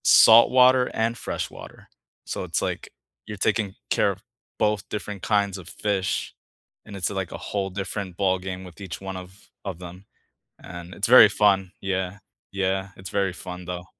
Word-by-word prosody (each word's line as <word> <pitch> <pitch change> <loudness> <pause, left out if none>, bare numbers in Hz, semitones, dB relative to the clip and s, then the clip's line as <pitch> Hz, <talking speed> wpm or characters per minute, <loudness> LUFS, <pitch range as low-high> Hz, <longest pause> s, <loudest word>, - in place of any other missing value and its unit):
Saltwater 125 +3 +7
and 115 +1 0
freshwater. - - -6 0.4
So - - -4
it's, - - -1
like, - - -3 0.4
you're 105 - -7
taking 100 0 0
care - - +3
of - - -10 0.3
both 105 -1 0
different 105 -2 -5
kinds 100 -2 +1
of 90 - -11
fish, 100 -3 -2 0.5
and 105 - -10
it's, 90 -3 -1
like, 95 -3 -4
a - - -5
whole 100 -2 -3
different 95 -1 -5
ballgame 95 -1 -1
with 90 +2 -13
each 95 -4 -6
one 95 -1 -5
of 95 +2 -12 0.2
of 95 -4 -5
them, 90 +2 -10 0.6
and 90 0 -9
it's 100 - -1
very 120 -2 +10
fun. 95 -3 +2
Yeah. 95 0 -2 0.3
Yeah. 95 0 -1
It's 95 0 -9
very 100 -2 0
fun, 90 0 -8
though. 90 0 -5
95 Hz, 165 wpm, -25 LUFS, 95-105 Hz, 0.6 s, very